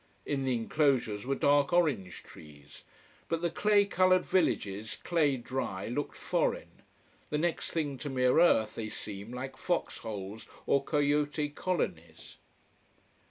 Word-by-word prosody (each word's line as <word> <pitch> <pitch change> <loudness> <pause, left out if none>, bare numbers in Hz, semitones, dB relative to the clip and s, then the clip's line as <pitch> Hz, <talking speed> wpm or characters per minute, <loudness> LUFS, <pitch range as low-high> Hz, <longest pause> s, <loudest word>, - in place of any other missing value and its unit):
In 135 -2 -1
the 130 -2 +1
enclosures 120 -3 +1
were 135 - +1
dark 140 0 +3
orange 140 - +1
trees. 75 -2 -14 0.5
But 165 0 -1
the 170 - +1
clay 205 +2 +3
coloured 185 -1 +3
villages, 110 - 0
clay 150 -6 +2
dry, 120 -6 -4
looked 145 +5 -3
foreign: - - -2 0.5
the 150 - 0
next 170 +2 -1
thing 145 -5 -2
to 145 - -4
mere 125 +1 +3
earth 110 -11 +4
they 110 -1 -5
seem, 105 +1 -7
like 130 +2 -6
fox 170 -7 -2
holes 105 -1 -7 0.2
or 140 - +2
coyote 145 0 +1
colonies. 85 - -4
135 Hz, 135 wpm, -30 LUFS, 110-160 Hz, 0.5 s, earth